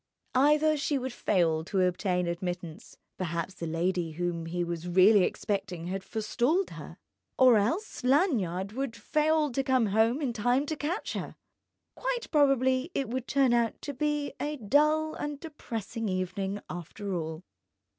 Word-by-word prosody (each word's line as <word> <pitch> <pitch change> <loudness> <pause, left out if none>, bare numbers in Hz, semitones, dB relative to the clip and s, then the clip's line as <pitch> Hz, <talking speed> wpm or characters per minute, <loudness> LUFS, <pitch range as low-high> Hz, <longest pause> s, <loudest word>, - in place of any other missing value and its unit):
Either 300 +4 +4
she 290 0 0
would 260 -1 -4
fail 165 -8 +1
to 190 +3 -2
obtain 180 0 +1
admittance 170 -1 -5 0.2
(perhaps 170 0 -2
the 170 - -6
lady 170 0 -1
whom 170 0 -3
he 175 +1 -1
was 170 0 -4
really 190 +3 +6
expecting 195 -4 -2
had 190 +2 -4
forestalled 240 - 0
her) - - -9 0.4
or 255 -2 +7
else 285 - -1
Lanyard 230 - +1
would 255 0 -3
fail 305 +6 +1
to 270 - 0
come 260 -3 +3
home 220 +6 +2
in 270 -6 -1
time 245 +5 +1
to 315 - -3
catch 310 +7 -3
her! - - -5 0.6
Quite - - -3
probably 270 -1 +3
it 270 -5 -1
would 255 +1 -3
turn 270 -3 +3
out 235 -1 +1
to 285 - -4
be 295 +1 -1
a 295 +1 -2
dull 305 +7 +2
and 295 -1 -5
depressing 230 - -5
evening, 190 +2 -2
after 185 +3 -6
all.... 160 0 -4
225 Hz, 155 wpm, -29 LUFS, 180-285 Hz, 0.6 s, or